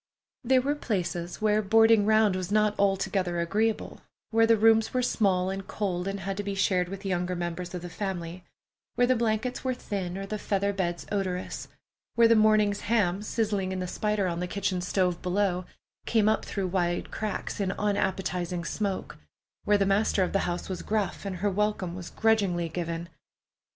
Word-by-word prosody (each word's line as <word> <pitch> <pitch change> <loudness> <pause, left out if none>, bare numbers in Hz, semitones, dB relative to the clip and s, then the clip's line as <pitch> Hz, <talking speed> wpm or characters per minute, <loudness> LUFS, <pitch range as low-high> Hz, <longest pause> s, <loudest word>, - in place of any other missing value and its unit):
There 255 +1 +3
were 285 +2 +1
places 180 -9 -3
where 215 0 +3
boarding 225 0 +5
round 215 -3 +4
was 185 0 -4
not 210 0 +3
altogether 195 -3 +1
agreeable; 215 +6 -1 0.3
where 225 0 +4
the 230 0 +5
rooms 225 +2 +4
were 250 - +2
small 190 -6 +1
and 195 0 -5
cold 185 -3 -2
and 195 0 -3
had 195 +1 -3
to 205 - -2
be 200 -1 -3
shared 185 -2 +1
with 195 +1 -7
younger 180 -1 -1
members 175 +1 -4
of 180 - -6
the - - -5
family; 180 -3 -4 0.5
where 245 - +4
the 255 +1 +3
blankets 230 +1 -1
were 260 -1 0
thin, 190 -6 -4
or 195 - -4
the 210 +1 -4
feather 200 0 0
beds 175 -3 -2
odorous; 185 -3 -3 0.5
where 235 0 +6
the 230 - +5
morning's 215 -2 +4
ham 205 -4 +1
sizzling 210 -3 -1
in 190 - -3
the 185 - -2
spider 210 +2 -1
on 170 -1 -2
the 180 - -2
kitchen 190 -1 -1
stove 180 -1 0
below 185 -1 0 0.4
came 220 -2 +3
up 220 0 +2
through 195 -3 -2
wide 175 -1 -1
cracks 215 -1 -4
in 195 -2 0
unappetizing 185 -4 -1
smoke; 200 +1 -3 0.5
where 205 0 +4
the 200 - +2
master 195 0 +2
of 180 - -2
the 195 - +1
house 175 0 -3
was 185 -2 -4
gruff, 210 -2 -2
and 195 -2 -3
her 200 +3 0
welcome 205 -3 -1
was 180 -1 -7
grudgingly 200 -6 +1
given. 170 0 -4
195 Hz, 185 wpm, -28 LUFS, 180-215 Hz, 0.5 s, where